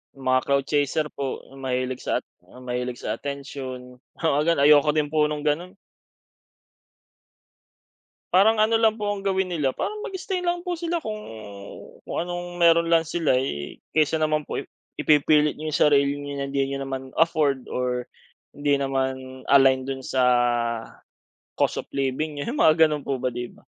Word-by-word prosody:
Mga 130 -1 +1
crowd 140 -1 +1
chaser 150 +1 +1
po 135 -2 -4 0.2
mahilig 130 -1 -3
sa - - 0
at - - -23 0.4
mahilig 125 0 -3
sa 105 - -3
atensyon. 130 -2 -7 0.2
Oo, 155 -3 +2
gan 165 -2 +2
ayoko 150 +1 +6
din 150 -1 0
po 150 0 +2
nung 150 - -2
ganon. 170 +6 -1 2.6
Parang 215 +4 +5
ano 225 +1 +3
lang 220 -1 +3
po 210 -2 -2
ang 205 - -3
gawin 190 -1 0
nila, 145 -6 0
parang 425 0 -3
mag-stay 380 -2 -3
lang 350 0 -1
po 355 -2 -3
sila 340 -1 -2
kung 215 -1 -4 0.9
kung - - -4
anong 175 0 -5
meron 170 -1 +4
lang 165 -1 +4
sila, 160 -4 +1
eh. 75 - -2 0.2
Kaysa 155 0 +2
naman 155 -1 0
po - - -4
ip - - -5 0.2
ipipilit 150 0 +3
yung 155 -1 -3
sarili 140 -1 +4
niyo 145 0 -6
na 140 - -2
hindi 140 0 0
niyo 135 0 -3
naman 135 -1 -5
afford 150 -5 +2
or 125 -1 -2 0.5
hindi 145 -1 +1
naman 130 -1 -3
align 135 -1 +5
dun 135 0 -4
sa 130 0 0 1.4
cost - - +2
of - - -35
living 140 +2 -2
niyo, - - -4
yung - - +2
mga 160 0 +6
ganun 150 -2 -3
po 135 -2 -2
ba, 130 - -1
di 120 -1 -4
ba? - - -21
145 Hz, 165 wpm, -24 LUFS, 135-165 Hz, 2.6 s, ayoko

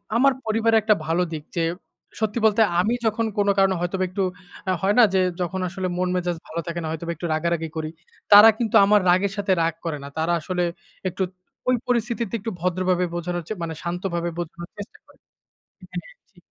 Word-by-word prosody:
আমার 275 +3 +5
পরিবারে 225 +1 +2
একটা 215 0 +4
ভালো 165 +3 +1
দিক 155 -2 -5
যে, 165 - +2 0.6
সত্যি 220 +2 0
বলতে 220 +1 +4 0.2
আমি 210 +6 +2
যখন 220 +1 +1
কোন 205 0 +2
কারণে 195 -1 +4
হয়তোবা 185 +2 -1
একটু 195 +2 -1 0.5
আ - - +3
হয় 200 +2 +2
না? - - +9
যে, 190 - +4 0.2
যখন 185 +2 -2
আসলে 190 0 -3
মন 180 0 0
মেজাজ 175 -1 -1
ভালো 165 - -4
থাকে 170 0 -3
না, 160 - -4
হয়তোবা 165 +1 -4
একটু 170 - -6
রাগারাগি 165 0 -1
করি। 155 -1 -2 0.4
তারা 210 +2 +11
কিন্তু 225 -3 -1
আমার 210 +1 +5
রাগের 190 +2 +3
সাথে 200 -1 0
রাগ 165 0 +1
করে 160 -3 -2
না। - - -7
তারা 160 +2 +1
আসলে 180 +2 -2 0.5
একটু 185 - -7 0.5
ওই 255 - +4
পরিস্থিতিতে 235 -2 -1
একটু 225 +3 -4
ভদ্রভাবে 180 0 +1
বোঝানো 175 +1 -2
হচ্ছে, 170 +5 -5
মানে 165 - -3
শান্তভাবে 175 0 -2
বোঝানোর 170 0 -6
চেষ্টা 205 +5 -9
করে - - -22 0.7
হ্যাঁ, - - -7 0.2
জি। - - -35
185 Hz, 195 wpm, -23 LUFS, 170-210 Hz, 0.7 s, তারা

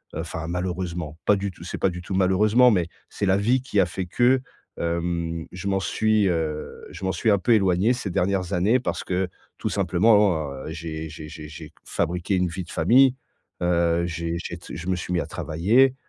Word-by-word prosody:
heu - - -3
enfin, 80 -1 -5
malheureusement, 90 -3 -3
pas 105 - +5
du 100 0 -3
tout 85 -1 -13
c'est - - -5
pas 95 - +3
du 90 0 -6
tout 95 +2 -4
malheureusement, 105 +6 +4
mais, 90 -5 +1 0.2
c'est - - -3
la 95 0 +4
vie 120 +6 +2
qui 125 -5 -1
a - - +3
fait 90 +2 -4
que, 125 +7 +3 0.4
hem 85 -1 -2
je 90 +2 -6
m'en 95 -1 +1
suis, 105 +3 +2
heu 80 -3 -3
je - - -10
m'en 95 - +1
suis 95 +5 0
un 100 - +3
peu 120 - +1
éloigné 95 +2 +3
ces 120 -5 -4
dernières 95 +1 0
années, 100 +8 +3
parce 130 - -3
que 95 0 -1 0.3
tout - - -3
simplement, 100 +3 +3
oh 105 -2 +4
en, 75 -4 -3
heu, - - -4
j'ai 80 -1 -5
j'ai 75 0 -9
j'ai 75 -1 -9
j'ai 80 -1 -9
q - - -51
fabriqué 90 +3 -1
une 90 0 +2
vie 90 +2 -5
de 85 - -12
famille. 130 +1 +5 0.5
Heu, 85 -1 +2
j'ai 85 0 -3
j'ai 85 - -5
tse 85 - -11
je 85 +1 -7
me 95 - +2
suis 90 - -5
mis 85 - +2
à - - -4
travailler. 110 +12 +2
90 Hz, 225 wpm, -24 LUFS, 85-100 Hz, 0.5 s, pas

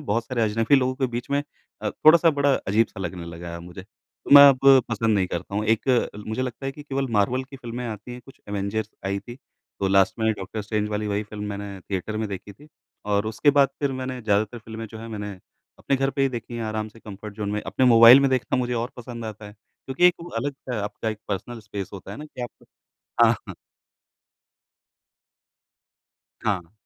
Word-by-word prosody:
बहुत 115 +2 0
सारे 120 -2 -1
अजनबी 110 +4 +2
लोगों 130 -1 +1
के 130 0 0
बीच 120 +1 -5
में 140 0 +1 0.4
अ, - - -1
थोड़ा-सा 165 +1 +6
बड़ा 140 -2 +2
अजीब-सा 105 -2 0
लगने 85 -1 -5
लगा 85 +1 -8
है 85 - -6
अब 85 - -9
मुझे, 90 +2 -10
तो 100 - -18
मैं 140 - +12
अब 135 -2 +4 0.3
पसंद 115 -1 +1
नहीं 95 -2 +2
करता 90 +2 -5
हूँ। 105 +1 0
एक, 110 +4 +1 0.4
मुझे 110 +4 -2
लगता 130 +1 -5
है 135 - -2
कि 150 - -11
केवल 135 -2 -2
मार्वल 125 +6 +1
की 135 +1 -12
फ़िल्में 120 -1 -6
आती 110 +2 -7
हैं, 125 - -8
कुछ 135 +1 -17
एवेंजर्स 100 +1 -2 0.2
आई 100 +1 -1
थी। 120 +3 -10 0.4
तो 100 - +1
लास्ट 95 +3 +3
में 110 0 +2
डॉ. 100 -3 -7 0.2
स्ट्रेंज 105 0 -1
वाली 105 0 -2
वही 105 0 -1
फ़िल्म 105 0 -7
मैंने 100 -1 -6
थिएटर 95 +3 -4
में 110 0 -2
देखी 100 +1 -7
थी 145 +9 -18 0.4
और 100 0 0
उसके 110 +7 +3
बाद 140 -1 +4
फिर 140 -2 0
मैंने 130 -1 -4
ज़्यादातर 110 +2 0
फ़िल्में 110 0 -8
जो 110 +1 -10
हैं, 115 +1 -8
मैंने 105 -2 -5 0.5
अपने 140 - 0
घर 135 +1 +1
पे 140 - -1
ही 135 - +3
देखी 120 -2 -6
हैं, 115 - -3
आराम 110 0 -3
से 115 +1 -18
कम्फ़र्ट 105 0 -9
ज़ोन 105 -2 -3
में। 105 - -1
अपने 130 - +1
मोबाइल 115 +2 +9
में 140 -1 +2
देखना 130 -1 0
मुझे 125 -1 -1
और 120 +2 -2
पसंद 120 -1 -7
आता 110 -1 -7
है, 105 - -11
क्योंकि 130 - -1
एक 180 - +5
वो 170 - -8
अलग-सा 125 -3 -3
आपका 105 +2 -4
एक 110 -1 -4
पर्सनल 115 +4 -4
स्पेस 100 -2 -6
होता 100 -3 -9
है - - -8
ना 150 - -7
कि 150 -4 -11
आप 120 - -9 0.6
हाँ। - - +1 2.9
हाँ। 90 -4 -1
110 Hz, 215 wpm, -24 LUFS, 105-130 Hz, 2.9 s, मैं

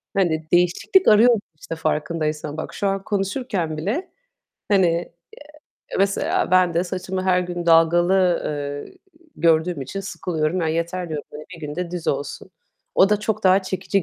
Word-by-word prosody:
Hani, 160 -5 0
değişiklik 180 - +3
arıyoruz, 225 +2 +6 0.2
işte, 165 - -6
farkındaysan. 155 -1 -2
Bak - - -5
şu 200 - -1
an 195 0 -1
konuşurken 195 - -2
bile, 245 - -2 0.6
hani, 195 -3 +4
eee, 170 0 -1 0.9
mesela 195 -2 +1
ben 185 -2 +4
de 170 +2 +1
saçımı 185 +1 -4
her 185 -1 +3
gün 175 -1 -5
dalgalı, 175 +2 +4
eee, 145 - -5 0.4
gördüğüm 165 -1 +2
için 165 +10 -5
sıkılıyorum. 175 -3 -2
"Ya 165 - 0
yeter!" 170 +2 -2
diyorum, 150 -2 -4
hani, 150 +1 -9
bir 170 - -12
gün 145 - -6
de 180 -1 -3
düz 175 -2 -4
olsun. 145 +6 -3 0.4
O 195 - +5
da 210 0 +1
çok 215 0 -2
daha 190 +1 +5
çekici 190 +1 -1
175 Hz, 160 wpm, -22 LUFS, 160-195 Hz, 0.9 s, arıyoruz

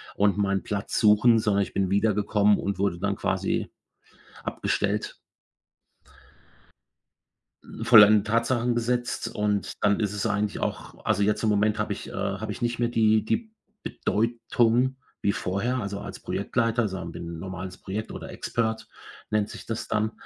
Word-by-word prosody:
und 100 0 +2
meinen 100 -1 0
Platz 100 -1 -3
suchen, 110 +2 +5
sondern 105 -2 +2
ich - - -8
bin 95 -2 0
wiedergekommen 105 0 +3
und 100 -1 -3
wurde 95 -3 0
dann - - -1
quasi - - -1 0.7
abgestellt. - - -2 2.7
Vollendeten 105 -3 +8
Tatsachen 120 +2 +1
gesetzt 120 0 -1
und 105 -2 -1
dann 100 -1 +3
ist 105 -2 0
es 105 +1 -2
eigentlich 105 -2 -1
auch - - -5
also, 100 - +1
jetzt 105 +1 +1
im 110 - +2
Moment 105 0 +2
habe - - -1
ich - - -9
äh, - - -10
habe - - -3
ich - - -9
nicht 120 0 -1
mehr 120 0 +1
die 110 -2 +3
die 220 - -1 0.3
Bedeutung 120 +3 +1 0.3
wie 100 - +2
vorher 105 +9 -1
also, 100 -3 -4
als - - -8
Projektleiter, 115 0 0
also 95 -4 -2
an 85 -2 -6
bin 85 -1 -7
normales 95 +1 -7
Projekt 105 +3 -5
oder - - -8
Expert, 110 -1 -2 0.4
nennt 105 -1 +1
sich - - -9
das 115 -1 -4
dann, 110 +1 0
105 Hz, 155 wpm, -26 LUFS, 100-115 Hz, 2.7 s, Vollendeten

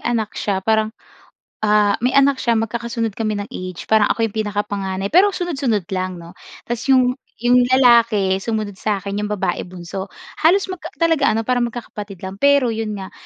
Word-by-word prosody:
anak 225 -3 -1
siya 190 -2 -2
parang, 220 -1 +2 0.7
ah, 210 -1 +3
may 245 - +2
anak 275 -1 +4
siya 235 -1 +1
magkakasunod 230 0 -2
kami 215 0 -2
ng 205 0 -6
age. 185 -1 -6
Parang 215 -1 +3
ako 225 - +1
'yong 215 - -2
pinakapanganay 200 -1 -3
pero 380 +4 +6
sunod-sunod 280 - -1
lang 185 -1 -2
'no? 170 +1 -11 0.3
Tapos 240 +3 -4
'yong 255 -2 +4 0.3
'yong 245 0 +4
lalaki 235 -7 +4
sumunod 210 -2 -3
sa 205 -3 -1
akin, 200 - -5
'yong 210 - -1
babae 185 -3 -2
bunso. 180 +2 -7 0.3
Halos 380 +4 +3
magka 345 -3 -7
talaga 325 -4 +2
ano 225 - 0
para 250 +2 0
magkakapatid 215 -5 -5
lang, 190 +1 -7
pero 280 -4 +4
'yon 220 -1 -3
nga, 190 -2 -7
220 Hz, 175 wpm, -20 LUFS, 200-250 Hz, 0.7 s, pero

